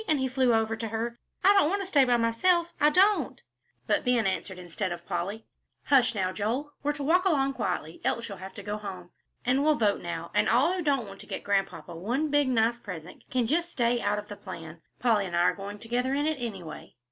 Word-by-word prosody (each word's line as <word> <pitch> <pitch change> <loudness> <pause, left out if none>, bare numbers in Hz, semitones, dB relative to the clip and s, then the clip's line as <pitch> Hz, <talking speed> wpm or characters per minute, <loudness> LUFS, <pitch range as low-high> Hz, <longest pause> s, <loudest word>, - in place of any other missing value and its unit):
and 310 - +3
he 265 - +1
flew 255 -1 +2
over 225 0 +2
to 225 0 -4
her. 230 +2 -3 0.2
"I 395 +2 +7
don't 395 -7 +4
want 400 +2 0
to - - -6
stay 290 -8 +4
by 245 -1 +3
myself, 335 +10 +2
I 295 - +6
don't." 370 - +3 0.5
But - - +1
Ben 245 -3 +2
answered 190 0 -2
instead 180 +1 -4
of 175 0 -6
Polly. 195 +6 -3 0.4
"Hush 255 -4 +4
now, 185 -2 0
Joel, 240 +10 -2
we're 290 - +1
to 290 -1 -5
walk 350 +6 +3
along 275 -6 +2
quietly, 175 -8 -3
else 235 - -1
you'll 200 -4 -8
have 190 +1 -9
to - - -8
go 210 0 -3
home. 185 -4 -8 0.3
And 255 +3 +3
we'll 305 0 +4
vote 210 -6 +1
now, 170 -1 -5
and 210 +1 +3
all 265 +10 +4
who 370 - -2
don't 275 -8 +1
want 195 0 -11
to - - -11
get - - -5
Grandpapa 195 -3 -1
one 245 - -1
big, 290 -1 +3
nice 235 -1 +2
present, 180 -6 -9
can 255 -2 +1
just 335 +8 +1
stay 240 -5 +1
out 210 - +1
of 210 0 -6
the 205 - -7
plan. 165 -5 -9 0.2
Polly 220 -5 +2
and 175 - -4
I 170 - +3
are 175 - +3
going 200 +1 -7
together 245 +4 -1
in 290 +1 0
it, 310 -1 0
anyway." 190 -10 -7
230 Hz, 235 wpm, -28 LUFS, 195-280 Hz, 0.5 s, I